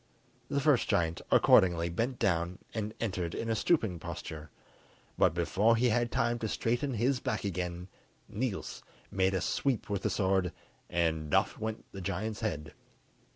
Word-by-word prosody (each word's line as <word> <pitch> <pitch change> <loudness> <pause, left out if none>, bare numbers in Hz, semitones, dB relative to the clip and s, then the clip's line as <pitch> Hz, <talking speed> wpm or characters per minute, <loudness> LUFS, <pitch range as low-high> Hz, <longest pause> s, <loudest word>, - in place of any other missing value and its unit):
The 140 - +1
first 140 -3 +3
giant 85 -1 +1
accordingly 85 -2 +5
bent 115 +9 -1
down 85 -3 0 0.2
and 110 -1 -3
entered 90 -6 -2
in 115 0 -2
a - - +2
stooping 110 - +1
posture, 80 -2 -7 0.7
but - - +3
before 100 +6 +3
he 120 +2 +3
had 120 +1 +1
time 120 0 +1
to 110 - -2
straighten 120 +5 -1
his 125 +4 +1
back 110 - -2
again 90 -2 -3 0.4
Niels 115 -3 -3 0.3
made 95 0 +2
a 95 - 0
sweep 130 -6 -1
with 100 -2 -1
the - - 0
sword, 95 -3 +1 0.4
and 80 -3 0
oft - - +2
went 110 0 -4
the 100 - -7
giant's 105 +4 -3
head. 80 -10 -3
100 Hz, 155 wpm, -31 LUFS, 85-115 Hz, 0.7 s, accordingly